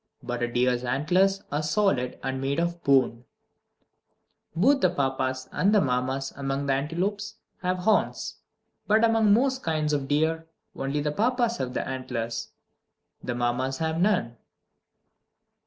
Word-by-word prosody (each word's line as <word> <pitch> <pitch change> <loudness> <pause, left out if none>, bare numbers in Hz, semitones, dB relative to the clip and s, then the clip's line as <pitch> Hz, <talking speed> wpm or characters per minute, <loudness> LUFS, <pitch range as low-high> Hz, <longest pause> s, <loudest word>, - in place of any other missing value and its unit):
But 120 0 -4
a 120 - +1
deer's 125 0 +1
antlers 180 +10 +1
are 145 +2 0
solid, 150 -6 +1
and 130 0 -2
made 140 +3 -1
of 170 0 -2
bone. 130 -4 +3 1.3
2. - - -4
Both 275 +6 +4
the 185 - +4
Papas 130 -4 -1
and 205 +3 +2
the - - +6
Mammas 130 -1 -1
among 140 0 -2
antelopes 190 +9 -2 0.3
have 185 0 0
horns. 210 +4 0 0.5
But 215 +2 +4
among 225 -2 +3
most 260 +4 +3
kinds 155 -4 0
of 140 -2 -1
deer, 160 +3 0 0.3
only 140 +2 -2
the 150 0 -1
Papas 235 - +1
have 125 0 -4
the - - -2
antlers; 120 -3 -4 0.7
the 120 - -3
Mammas 125 +2 -1
have 160 +1 -1
none. 180 - +1
150 Hz, 140 wpm, -26 LUFS, 130-195 Hz, 1.3 s, the